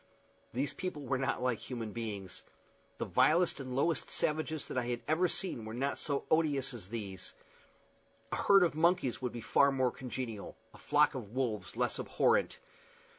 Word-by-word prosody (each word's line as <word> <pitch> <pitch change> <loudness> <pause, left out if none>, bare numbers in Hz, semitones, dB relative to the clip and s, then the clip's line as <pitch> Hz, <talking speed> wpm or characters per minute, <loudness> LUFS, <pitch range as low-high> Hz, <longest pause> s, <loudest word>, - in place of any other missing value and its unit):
These 130 +3 -1
people 180 -6 -4
were 135 0 -1
not 135 -1 -1
like 125 -3 +1
human 115 -4 -5
beings. 105 -5 -5 0.6
The - - -2
vilest 170 -2 +3
and 130 -2 -5
lowest 160 +5 +1
savages 155 0 -1
that - - -4
I 120 - -3
had 120 -1 -2
ever 165 +4 +3
seen 175 -9 -2
were 110 +1 -6
not 135 +3 -1
so 140 -2 -1
odious 145 -5 +2
as 105 -6 -8
these. 100 -5 -5 1.0
A - - 0
herd 195 -2 +6
of 175 - +2
monkeys 165 -5 +2
would 125 -2 -1
be 120 - -6
far 140 +5 +4
more 130 -2 +2
congenial, 125 -4 -6 0.2
a - - -14
flock 150 +1 +3
of 120 -4 -7
wolves 110 -6 -2
less 125 0 0
abhorrent. 480 +2 +2
130 Hz, 175 wpm, -33 LUFS, 115-155 Hz, 1.0 s, herd